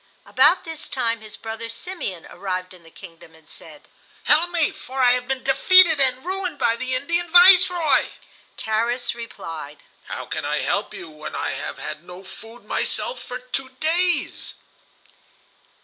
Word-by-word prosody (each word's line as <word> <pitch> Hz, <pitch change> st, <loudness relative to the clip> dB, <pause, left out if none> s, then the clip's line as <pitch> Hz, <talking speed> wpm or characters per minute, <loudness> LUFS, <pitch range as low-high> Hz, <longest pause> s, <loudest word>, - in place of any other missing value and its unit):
About 365 Hz, -, +4 dB
this 325 Hz, -2 st, -7 dB
time 230 Hz, -4 st, -1 dB
his 215 Hz, -1 st, -10 dB
brother 225 Hz, +1 st, -6 dB
Simeon 230 Hz, -, -5 dB
arrived 185 Hz, -1 st, -4 dB
in 180 Hz, -, -16 dB
the 165 Hz, -, -17 dB
kingdom, 165 Hz, 0 st, -14 dB
and 160 Hz, -1 st, -22 dB
said: 155 Hz, -2 st, -9 dB, 0.4 s
"Help 320 Hz, +4 st, +3 dB
me, 340 Hz, -3 st, +1 dB
for 265 Hz, +1 st, -9 dB
I 250 Hz, -1 st, +5 dB
have 250 Hz, 0 st, 0 dB
been 265 Hz, -1 st, -2 dB
defeated 320 Hz, +4 st, +6 dB
and 260 Hz, +1 st, +1 dB
ruined 375 Hz, 0 st, -3 dB
by 230 Hz, -, +2 dB
the 255 Hz, +2 st, -3 dB
Indian 340 Hz, +6 st, -1 dB
Viceroy." 355 Hz, -2 st, +6 dB, 0.5 s
Tarras 235 Hz, +3 st, -1 dB
replied: 165 Hz, -10 st, -9 dB, 0.2 s
"How -, -, -6 dB
can -, -, -5 dB
I -, -, -1 dB
help -, -, -1 dB
you, -, -, -8 dB
when 155 Hz, -1 st, -9 dB
I -, -, -2 dB
have -, -, -6 dB
had 155 Hz, -, -7 dB
no 180 Hz, +2 st, -11 dB
food 225 Hz, +5 st, -13 dB
myself -, -, -3 dB
for 250 Hz, -, -6 dB
two 255 Hz, +1 st, -5 dB
days?" 350 Hz, +3 st, 0 dB
250 Hz, 160 wpm, -22 LUFS, 195-325 Hz, 0.5 s, defeated